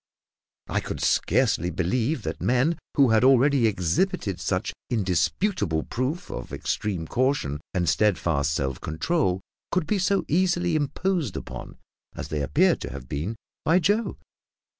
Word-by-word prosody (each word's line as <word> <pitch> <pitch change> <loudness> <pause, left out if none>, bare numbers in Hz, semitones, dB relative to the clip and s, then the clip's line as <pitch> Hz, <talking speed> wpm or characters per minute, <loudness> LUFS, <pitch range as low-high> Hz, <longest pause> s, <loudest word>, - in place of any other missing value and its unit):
I - - 0
could - - -5
scarcely 85 - +2
believe 110 - 0
that - - -4
men 130 +7 +2 0.2
who 135 -5 +5
had 110 +2 +4
already 135 -1 +5
exhibited 95 - 0
such - - -1 0.2
indisputable 95 - 0
proof 145 +8 -3
of - - -6
extreme 95 -6 -2
caution 120 - 0
and 90 -2 +1
steadfast 80 -5 +2
self 65 -3 -2
control 95 - 0 0.3
could 185 -3 +1
be 205 +5 0
so 195 +1 +1
easily 175 0 +2
imposed 155 - -1
upon - - -8 0.4
as - - -6
they 75 -1 -2
appeared 70 +1 +3
to - - -5
have 60 - -8
been 80 - -3 0.3
by 165 +3 +4
Joe! 205 +6 +1
120 Hz, 140 wpm, -25 LUFS, -, 0.4 s, who